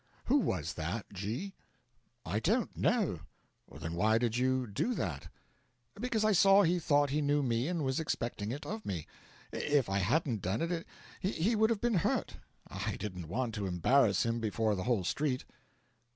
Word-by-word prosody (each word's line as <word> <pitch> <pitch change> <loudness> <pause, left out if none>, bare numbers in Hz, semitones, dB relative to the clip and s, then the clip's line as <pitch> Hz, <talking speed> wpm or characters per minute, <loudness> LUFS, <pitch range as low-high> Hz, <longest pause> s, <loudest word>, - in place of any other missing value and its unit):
'Who 280 +4 +4
was 90 - -1
that, 90 +7 -3
G 110 - -4 0.4
?' - - -43
'I 100 +7 -1
don't 220 - 0
know.' 210 - +1 0.5
'Then 80 - -6
why 110 +6 +3
did 115 -1 0
you 130 +1 +1
do 120 - -1
that?' 75 - -3 0.7
'Because 220 0 -1
I 215 - +4
saw 195 +1 +6
he 175 0 +2
thought 145 -3 +2
he 150 +2 +1
knew 145 0 +2
me 120 +1 0
and 170 -3 -1
was 130 +1 0
expecting 115 -8 -2
it 145 +4 -5
of 215 +1 -5
me. 85 -6 -4 0.5
If 145 -7 +1
I 100 - +2
hadn't 115 - +1
done 95 - -1
it 170 0 -2 0.3
he 195 +3 0
would 220 +1 +4
have 225 -3 0
been 235 -6 +2
hurt. - - -1 0.3
I 95 +2 -3
didn't 90 -5 -6
want 115 +6 -2
to 105 -2 -3
embarrass 100 +5 +3
him 115 0 0
before 110 0 0
the 95 -2 -3
whole 120 -6 +1
street.' 135 +6 -1
125 Hz, 180 wpm, -32 LUFS, 100-170 Hz, 0.7 s, saw